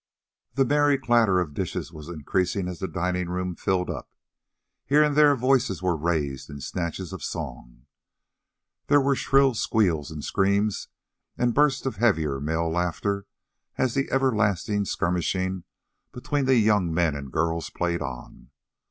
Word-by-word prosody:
The 135 -1 +3
merry 145 +1 +3
clatter 115 -7 +3
of 80 -5 -3
dishes - - -4
was 75 +1 -10
increasing 90 +4 -1
as 90 -2 -6
the 95 - -2
dining 90 0 -2
room 90 0 -2
filled 90 0 0
up. - - -6 0.7
Here 150 +2 +4
and 150 -1 +1
there 145 -1 +6
voices 125 - +1
were 90 -2 +1
raised 75 -4 -2
in 70 - -8
snatches 90 +5 -4
of 90 -6 -7
song. - - -7 1.0
There 145 0 +5
were 140 0 +2
shrill 135 0 +3
squeals 90 -10 +1
and 75 -3 -7
screams 100 +1 0 0.5
and 120 -1 +1
bursts 145 -1 +2
of 135 - -2
heavier 80 - +1
male 80 +2 -1
laughter 95 +4 -1 0.5
as 130 -2 +1
the 135 0 -1
everlasting 105 -6 +1
skirmishing 95 0 -1 0.5
between 140 +3 -2
the 130 0 +4
young 105 -6 +3
men 80 -2 +1
and 70 -2 -7
girls 80 +1 -1
played 85 -1 -2
on. 65 -3 -8
95 Hz, 150 wpm, -25 LUFS, 80-120 Hz, 1.0 s, there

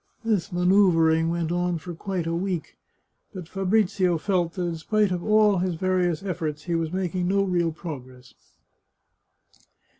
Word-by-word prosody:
This 210 -6 0
manoeuvring 175 -3 +3
went 170 -1 -1
on 175 0 0
for 170 +2 -8
quite 180 0 -4
a 165 - -2
week, 180 -1 -3 0.6
but 180 -3 -7
Fabrizio 190 -2 +1
felt 175 -1 0
that 180 - -3
in 170 -1 -2
spite 205 +5 +1
of 175 -1 -2
all 215 -2 +4
his 180 -1 -1
various 180 -1 0
efforts, 155 -5 -3
he 175 - -3
was 165 -1 -1
making 180 -1 -2
no 195 +1 +2
real 175 -3 0
prc^gress. 130 -6 -9
175 Hz, 150 wpm, -25 LUFS, 165-190 Hz, 0.6 s, all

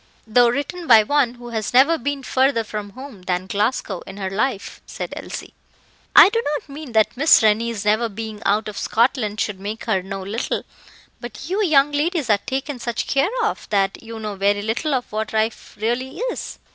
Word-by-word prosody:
"Though 235 +2 +4
written 290 +7 -3
by 225 -3 +8
one 260 0 +1
who 240 0 -10
has 225 0 -3
never 280 +6 +6
been 280 +2 -3
further 260 -2 +2
from 210 -1 -6
home 260 -6 -10
than 180 0 -2
Glasgow 205 -1 -1
in 190 - -9
her 190 -2 -4
life," 215 +1 -2
said - - -6
Elsie. - - -7 0.6
"I - - +10
do 460 +2 0
not 295 - -6
mean 280 -3 -9
that 220 +1 +3
Miss 285 -2 +5
Rennie's 220 0 +1
never 220 +2 +2
being 220 0 -7
out 210 +2 +1
of 210 - -5
Scotland 225 -3 +1
should 210 -4 -2
make 210 +3 -6
her 205 -5 +1
know 195 +1 -6
little; 210 +5 -3 0.6
but 240 +2 -8
you 390 +5 0
young 295 -5 +4
ladies 295 - 0
are 205 - +4
taken 270 +4 -4
such 235 -1 -3
care 275 +5 +1
of, 435 - -2
that 195 -1 0
you 225 0 -8
know 215 -1 -4
very 200 +1 +1
little 255 +7 -1
of 250 - -3
what 215 +1 -3
life 220 +1 -2
really 240 +4 -2
is." - - -4
230 Hz, 195 wpm, -21 LUFS, 210-275 Hz, 0.6 s, I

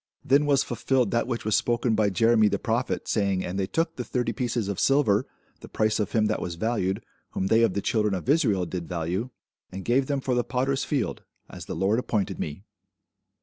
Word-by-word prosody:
Then 140 +3 +4
was 140 -2 +3
fulfilled 130 -6 0
that 115 0 +1
which 120 -4 -3
was 110 -2 +2
spoken 120 +1 +1
by 105 -1 +2
Jeremy 115 +2 +4
the - - 0
prophet, 120 +2 -2
saying, 100 -3 0
And 95 +2 -3
they 95 - 0
took 165 - -1
the 125 - -2
thirty 125 0 -2
pieces 120 -5 -2
of 100 -2 -3
silver, 135 -5 +3 0.3
the - - -12
price 110 0 0
of 105 - -2
him 110 -2 +3
that 105 - -1
was 85 - -4
valued, 100 -1 -1 0.3
whom 95 - -1
they 110 +4 +4
of 115 -5 +2
the 100 - -1
children 105 -3 +1
of 90 - -6
Israel 115 - +2
did 85 -1 -5
value; 90 +7 -2 0.4
and 95 0 -7
gave 130 +3 +2
them 140 -1 0
for 130 -1 -1
the 120 0 +2
potter's 135 +2 -1
field, 135 -7 -2 0.3
as - - -9
the - - -5
Lord 100 +5 +1
appointed 110 -6 -2
me. 75 +6 -5
110 Hz, 215 wpm, -26 LUFS, 100-125 Hz, 0.4 s, Then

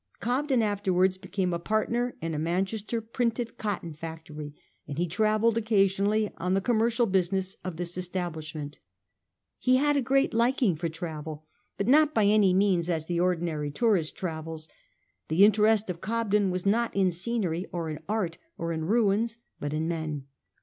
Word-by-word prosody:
Cobden 255 0 +1
afterwards 190 -3 +1
became 185 -1 -2
a 170 - -1
partner 230 +6 -1
in 165 0 -2
a. 150 - -2
Manchester 195 +7 -1
printed 230 +1 -2
cotton 195 -6 -3
factory; 155 -1 -8 0.3
and 145 -1 -6
he 175 +2 +1
travelled 215 +5 +2
occasionally 205 0 +2
on 180 +2 0
the - - +3
commercial 230 +3 +2
business 190 -1 0
of 180 -3 -5
this 175 0 -3
estab, 180 -1 -3
lishment. 155 -2 -7 0.8
He 255 0 +3
had 290 +2 +3
a 280 - +3
great 270 +1 +2
liking 235 - +2
for 165 +2 -2
travel; 155 -2 -6 0.3
but 200 - -1
not 300 +3 +5
by 215 - +4
any 205 -2 +5
means 185 -2 +2
as 160 -3 0
the 170 0 -1
ordinary 170 -4 0
tourist 190 -2 +1
travels; 160 -2 -5 0.6
the 165 +5 +4
in 210 - +7
terest 215 +1 +3
of 175 -2 -5
Cobden 210 -3 +1
was 185 0 -3
not 230 +4 +1
in 190 -2 +3
scenery, 180 -2 -1
or 170 -2 -3
in 155 - -5
art, 190 -6 -1 0.2
or 170 0 -3
in' 160 -1 -3
ruins, 220 +2 +2 0.2
but 145 - -3
in 155 +2 -1
men. 155 -4 -3
190 Hz, 170 wpm, -28 LUFS, 165-220 Hz, 0.8 s, in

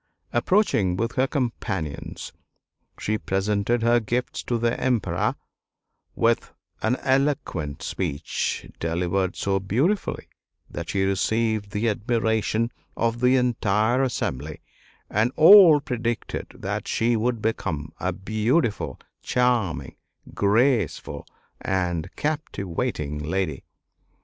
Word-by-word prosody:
Approaching 120 - +2
with 115 +3 -1
her 130 +1 +1
companions, 110 - -3 0.7
she 110 0 -1
presented 100 +5 0
her 120 +1 +4
gifts 120 +3 -2
to 120 - 0
the 115 +1 +1
Emperor 105 -9 +1 0.8
with 115 0 +1 0.3
an 110 +3 +2
eloquent 130 - 0
speech, 70 +3 -2
delivered 90 +3 -1
so 95 0 0
beautifully 130 - 0 0.4
that - - -6
she 95 -1 +1
received 110 +2 0
the 105 +3 -1
admiration 110 +1 0 0.3
of 115 0 0
the 125 +1 +4
entire 120 -1 +2
assembly, 80 - -2 0.5
and 110 +4 +1
all 165 -2 +9
predicted 120 -4 -3
that - - -4
she 115 +1 +1
would 115 +1 0
become 90 -8 -2
a 90 +2 -1
beautiful, 110 - 0 0.2
charming, 115 - 0 0.4
graceful, 105 - +1 0.3
and 90 -2 -1
captivating 100 - -3
lady. 80 -1 -2
110 Hz, 100 wpm, -24 LUFS, 95-125 Hz, 0.8 s, all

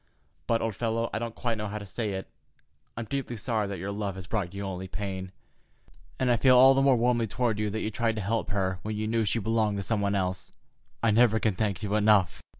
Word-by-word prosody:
But, 115 -1 +1
old 115 -3 -2
fellow—I 115 -1 -1
don't 115 -1 -5
quite 115 -3 -2
know 105 - -3
how 105 +1 -4
to 105 - -7
say 105 +1 -3
it—I'm 95 +3 -10
deeply 135 0 -3
sorry 110 -1 -1
that 100 -1 -4
your 95 +4 -4
love 100 -1 -3
has 95 -2 -8
brought 95 -2 -2
you 100 +1 -6
only 95 -1 -5
pain, 95 -1 -5 0.9
and 130 -1 +1
I 120 - +4
feel 130 +2 +5
all 130 +2 +8
the 135 - +2
more 135 -1 +5
warmly 120 -1 +2
toward 115 -1 -1
you 105 0 0
that 110 +2 -3
you 110 - -2
tried 115 +1 0
to 110 - -3
help 110 +3 -1
her 95 -2 -1
when 110 0 -4
you 110 +1 -2
knew 110 0 +1
she 105 - 0
belonged 110 -1 +1
to 100 - -3
some 105 +3 0
one 100 0 +1
else. 90 -2 -2 0.5
I 115 - +4
never 110 0 +4
can 110 -2 +1
thank 100 -2 -2
you 105 0 -2
enough." 105 -4 +3
110 Hz, 240 wpm, -28 LUFS, 100-115 Hz, 0.9 s, all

